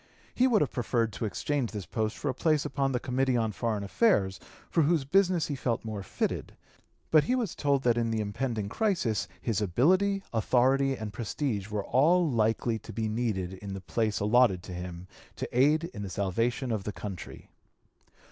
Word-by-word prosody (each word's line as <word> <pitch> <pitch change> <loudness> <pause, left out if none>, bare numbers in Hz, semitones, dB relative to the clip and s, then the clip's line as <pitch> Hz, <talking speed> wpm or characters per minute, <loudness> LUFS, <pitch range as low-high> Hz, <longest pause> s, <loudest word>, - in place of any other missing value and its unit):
He 255 - +3
would 225 -5 +3
have 145 - +1
preferred 115 -3 0
to 115 - -3
exchange 130 +4 -1
this 105 -4 -5
post 110 -1 -2
for - - -4
a 130 - +1
place 155 +2 +1
upon 135 -1 0
the 125 - 0
Committee 130 0 0
on 110 -2 0
Foreign 110 -1 -2
Affairs, 100 - +2 0.3
for 165 - +3
whose 155 -2 +2
business 180 +1 +3
he 145 - -3
felt 120 -3 -2
more 110 -2 -4
fitted. 95 - -3 0.6
But 155 -2 +6
he 250 - +1
was 235 -8 -1
told 140 -2 +1
that 120 -1 +3
in 115 -1 0
the 110 -1 -1
impending 110 0 -2
crisis 170 - 0
his 110 -4 -1
ability, 185 - +2
authority, 130 +4 +3
and 110 -3 -6
prestige 110 -1 -2
were 105 -2 -3
all 165 +6 +4
likely 115 -2 +1
to - - -10
be 110 -1 -2
needed 105 -5 -2
in 95 +1 -7
the - - -5
place 110 +3 -1
allotted 105 -3 +3
to 90 - -8
him 90 0 -7 0.3
to - - -4
aid 150 +5 +4
in 105 - -6
the 100 - -4
salvation 115 +7 -1
of 110 -3 -1
the 105 - -3
country. 100 -3 -8
120 Hz, 190 wpm, -29 LUFS, 105-140 Hz, 0.6 s, But